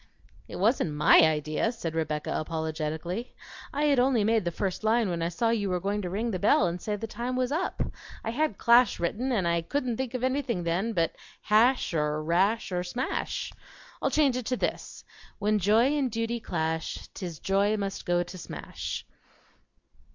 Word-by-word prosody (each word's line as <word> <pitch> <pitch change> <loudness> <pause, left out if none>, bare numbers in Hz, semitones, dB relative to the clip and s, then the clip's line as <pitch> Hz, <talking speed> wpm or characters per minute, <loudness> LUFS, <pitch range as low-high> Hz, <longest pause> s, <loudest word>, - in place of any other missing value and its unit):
"It - - -8
wasn't 200 - +1
MY 150 +2 +6
idea," 155 +5 +1
said 170 -9 -5
Rebecca 155 -2 -2
apologetically. 160 +6 -3 0.4
"I 290 - -1
had 285 -3 +4
only 250 -3 +3
made 220 -2 +2
the - - +1
first 190 +3 -3
line 220 -2 +2
when 170 -1 -2
I 165 - 0
saw 225 +7 0
you 205 -4 0
were 180 -1 0
going 200 +3 -1
to 180 - -4
ring 220 +6 -1
the 185 - -2
bell 205 0 +4
and 175 0 -2
say 210 - -2
the 205 - -5
time 240 +3 -4
was 255 0 0
up. 345 +5 -1 0.4
I 225 - -2
had 295 -3 0
'clash' 235 -1 +5
written, 220 +10 -1
and 195 -8 +1
I 170 0 +2
couldn't 250 +4 -2
think 260 -1 -3
of 250 - -3
anything 260 -7 0
then 180 +7 0
but 165 -4 0 0.3
'hash' 225 +1 +3
or 150 -1 0
'rash' 190 +7 +1
or 180 0 -1
'smash.' 245 +9 -3 0.5
I'll - - +2
change 285 -4 +3
it 250 -3 -3
to 255 - 0
this: - - -3 0.3
When 210 0 +1
Joy 225 +9 +4
and 275 -3 +1
Duty 230 +1 -2
clash, 160 -5 -3
'T - - -8
is 170 -3 -5
Joy 200 +4 +1
must 195 -1 -3
go 175 0 +1
to 175 +1 -10
smash." - - -6
205 Hz, 190 wpm, -28 LUFS, 170-240 Hz, 0.5 s, MY